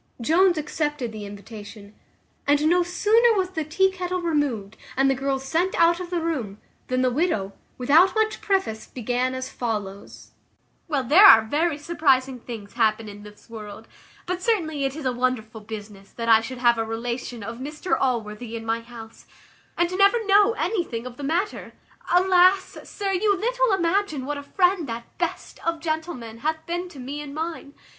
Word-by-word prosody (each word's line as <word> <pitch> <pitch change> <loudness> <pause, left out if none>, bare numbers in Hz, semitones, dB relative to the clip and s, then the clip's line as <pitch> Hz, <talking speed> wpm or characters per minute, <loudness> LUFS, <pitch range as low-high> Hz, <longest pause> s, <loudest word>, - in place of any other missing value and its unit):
Jones 345 +8 +3
accepted 295 -4 -2
the 210 -2 -7
invitation; 205 0 -11 0.5
and 290 +1 +3
no 355 +2 +4
sooner 430 +6 +3
was 370 -1 0
the 320 -4 -2
tea 380 +6 +2
kettle 365 -1 -3
removed, 285 - -1 0.2
and 270 +1 +4
the 270 - +4
girls 270 0 -2
sent 335 +7 0
out 340 +1 +4
of 360 -1 -6
the 350 -1 -1
room, 260 -12 -3 0.3
than 255 0 0
the 255 - +2
widow, 240 - 0 0.2
without 315 - +4
much 440 0 0
preface, 380 - -1
began 250 +1 -2
as 260 0 -5
follows: 205 -4 -5 0.6
"Well, 290 -5 0
there 305 - +6
are 225 - +9
very 300 +7 0
surprizing 275 -5 +1
things 225 -4 -9
happen 220 -2 +1
in 205 0 -10
this 210 0 -14
world; 220 -1 -9 0.4
but 360 0 -3
certainly 320 -10 0
it 270 0 -2
is 310 -3 -7
a 255 - +2
wonderful 240 -3 -2
business 205 -2 -9
that 230 -1 -5
I 225 -1 +6
should 250 +3 -7
have 240 -1 +3
a - - +1
relation 235 +1 -4
of 230 +3 -7
Mr 300 +6 -2
Allworthy 230 -2 -2
in 225 0 -6
my 225 +1 0
house, 230 -1 -12 0.5
and 345 +1 +1
never 400 +4 +4
know 410 +2 +5
anything 325 - -2
of 250 -1 -8
the 290 - -7
matter. 345 +9 -2 0.4
Alas! 370 +1 +4
sir, 400 -1 -3
you 400 +1 +2
little - - +1
imagine 345 -6 0
what 290 +1 -3
a - - -6
friend 360 0 +1
that 230 +1 -7
best - - -4
of 335 -1 -1
gentlemen 315 -8 -4
hath 315 +4 -2
been 350 +1 -3
to 305 - -14
me 280 +4 -5
and 290 -1 -8
mine. 320 -2 -5
285 Hz, 180 wpm, -24 LUFS, 230-350 Hz, 0.6 s, are